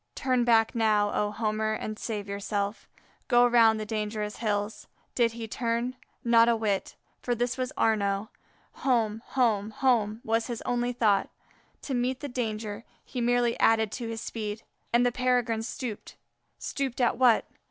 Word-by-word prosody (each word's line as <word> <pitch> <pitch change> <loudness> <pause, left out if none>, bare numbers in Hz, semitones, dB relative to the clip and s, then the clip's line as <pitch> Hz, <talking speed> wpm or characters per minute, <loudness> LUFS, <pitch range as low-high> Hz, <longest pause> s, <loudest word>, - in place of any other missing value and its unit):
Turn 255 -2 +1
back 225 -2 +4
now, 215 -3 +2
O 210 - +1
Homer, 215 0 -1
and 215 0 -5
save 210 -3 -4
yourself; 200 +1 -3 0.4
go 245 -1 +5
round 230 -2 +5
the 215 - -3
dangerous 210 -1 -3
hills. 210 -1 -2 0.3
Did 235 -2 +2
he 230 -1 -6
turn? 235 +2 -2 0.3
Not 235 0 +5
a 235 - +4
whit! 210 -3 -1 0.3
for 245 - -1
this 245 +2 -1
was 255 0 -3
Arnaux. 205 -1 +1 0.5
Home! 225 -4 +1
home! 220 -5 +1
home! 220 -3 +1
was 225 +1 0
his 240 -2 -5
only 245 0 0
thought. 215 -5 +2 0.5
To 275 - -4
meet 250 +1 0
the 290 - -5
danger, 220 -3 -3 0.2
he 250 - -4
merely 240 0 +2
added 220 -2 +3
to 235 -1 -5
his 225 0 -4
speed; 215 -1 -5 0.3
and 240 +1 +4
the 245 - +3
Peregrine 245 -3 +1
stooped; 225 -1 -6 0.4
stooped 270 -3 -3
at 240 -1 +2
what? 245 -3 +5
225 Hz, 160 wpm, -28 LUFS, 215-245 Hz, 0.5 s, go